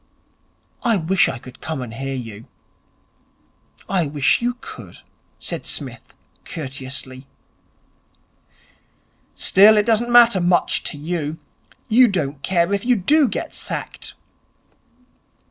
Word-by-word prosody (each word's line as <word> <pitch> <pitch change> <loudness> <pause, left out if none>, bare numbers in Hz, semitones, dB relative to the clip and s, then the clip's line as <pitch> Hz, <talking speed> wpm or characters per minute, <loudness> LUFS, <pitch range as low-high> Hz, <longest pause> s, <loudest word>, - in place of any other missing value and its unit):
I 235 -3 +2
wish 180 +2 +2
I 130 - -4
could 125 +1 -14
come 160 -1 -4
and 115 -2 -8
hear 135 +3 -4
you.' 115 -4 -8 1.4
'I 180 -5 +1
wish 140 - +2
you 245 +1 -1
could,' - - -10 0.4
said - - -5
Psmith - - -5 0.3
courteously. 130 -3 -7 2.1
'Still, 210 +3 +6
it 210 - +3
doesn't 235 +1 +1
matter 235 -5 +6
much 175 0 +2
to - - -3
you. 155 0 -3 0.5
You 245 +3 +6
don't 150 -9 -2
care 175 +2 +1
if 200 - -1
you 250 0 +3
do 285 - +3
get - - -4
sacked.' - - -5
175 Hz, 115 wpm, -21 LUFS, 135-215 Hz, 2.1 s, Still